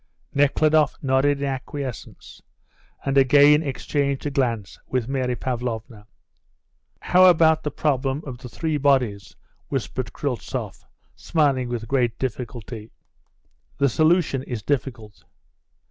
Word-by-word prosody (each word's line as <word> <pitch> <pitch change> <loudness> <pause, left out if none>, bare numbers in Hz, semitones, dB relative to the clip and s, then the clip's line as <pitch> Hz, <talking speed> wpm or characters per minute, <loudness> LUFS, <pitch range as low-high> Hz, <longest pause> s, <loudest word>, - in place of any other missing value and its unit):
Nekhludoff 150 +2 +3
nodded 140 +1 +2
in - - 0
acquiescence, 135 -1 -6 0.6
and 135 0 +3
again 145 +3 +6
exchanged 140 -1 -2
a 145 - -1
glance 115 -8 -2
with 125 -3 -1
Mary 130 -2 -1
Pavlovna. 115 -3 -5 0.9
"How 185 +1 +5
about 160 -3 +5
the 150 - -2
problem 135 0 -1
of 125 -4 -7
the 125 -1 -9
three 155 +4 -2
bodies?" 130 -8 +1 0.3
whispered - - -3
Kryltzoff, - - -5 0.3
smiling 140 -6 0
with 115 -2 -4
great 120 -3 0
difficulty. 120 -3 -5 0.9
"The 140 -1 +3
solution 155 0 +2
is 120 -5 -6
difficult." 120 -6 -3
135 Hz, 115 wpm, -23 LUFS, 120-145 Hz, 0.9 s, again